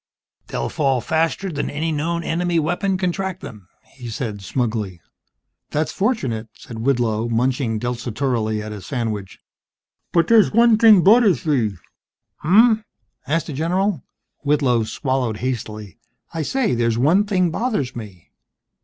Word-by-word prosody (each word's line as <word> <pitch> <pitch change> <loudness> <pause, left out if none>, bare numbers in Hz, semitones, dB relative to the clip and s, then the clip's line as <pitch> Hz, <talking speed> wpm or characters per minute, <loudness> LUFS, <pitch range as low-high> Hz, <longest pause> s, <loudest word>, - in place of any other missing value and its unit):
"They'll 65 - -3
fall 135 -4 +1
faster 165 +7 -1
than 145 -2 -3
any 160 +3 -2
known 170 +3 -1
enemy 175 +1 0
weapon 180 +5 0
can 185 -1 0
track 190 0 -4
them," 105 -6 -10 0.2
he 125 -3 -10
said, 110 -3 -4
smugly. 110 -5 -2 0.7
"That's 155 +1 -1
fortunate," 135 - -1
said 115 -2 -9
Whitlow, 120 -3 0
munching 120 0 0
desultorily 115 -2 -2
at 110 - -7
his 105 -3 -8
sandwich. 110 -7 -3 0.7
"Bud 170 -2 +3
dere's 225 0 +5
wud 230 0 +4
thig 215 -6 +7
budduhs 205 - +5
bee." 120 -10 +1 0.7
"Hmmf?" 220 +6 +5 0.4
asked 165 +2 0
the 155 - -6
general. 175 +3 0 0.4
Whitlow 140 -6 +1
swallowed 125 -1 -2
hastily. 110 -4 -5 0.3
"I 165 - -2
say, 255 - 0
there's 115 -1 +1
one 160 - +4
thing 185 -4 +1
bothers 210 - -2
me." 100 -7 -10
140 Hz, 135 wpm, -21 LUFS, 115-175 Hz, 0.7 s, thig